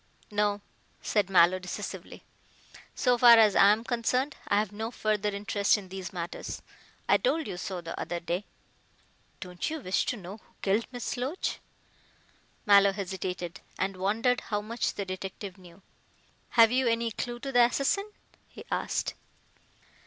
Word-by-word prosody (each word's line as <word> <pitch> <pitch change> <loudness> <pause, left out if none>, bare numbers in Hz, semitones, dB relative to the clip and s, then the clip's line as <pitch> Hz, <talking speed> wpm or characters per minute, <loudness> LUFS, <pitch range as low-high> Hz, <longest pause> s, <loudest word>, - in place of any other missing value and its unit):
"No," 205 0 +1 0.4
said 205 -3 +1
Mallow 185 0 +5
decisively, 185 0 -7 0.7
"so 250 -3 +2
far 235 -1 +9
as 215 -3 +5
I 195 - +7
am 215 +2 +1
concerned, 250 +4 0
I 200 - +2
have 210 -1 0
no 220 +2 -4
further 215 -3 0
interest 205 +1 +1
in 195 -3 -9
these 190 -1 -6
matters. 175 -1 -6 0.4
I - - +5
told 325 -11 0
you 195 - -5
so 180 0 -5
the 165 -1 -7
other 175 0 -3
day." 175 +4 -3 1.0
"Don't 180 -1 -4
you 320 0 -4
wish 190 -7 0
to 245 - -1
know 195 +1 -9
who - - -28
killed 205 +3 +1
Miss 245 +1 -4
Loach?" 270 +9 -2 1.1
Mallow 200 -1 +6
hesitated, 185 -2 -4 0.2
and 195 +1 -1
wondered 220 +7 +1
how 210 -2 -2
much 225 +3 -2
the 200 - -3
detective 190 +1 -6
knew. 180 +1 -16 0.7
"Have 225 -1 +8
you 255 0 +2
any 230 0 +1
clue 240 +2 -4
to 275 +2 -5
the 245 -2 +5
assassin?" 280 - 0 0.4
he - - -12
asked. - - -1
205 Hz, 155 wpm, -28 LUFS, 190-235 Hz, 1.1 s, far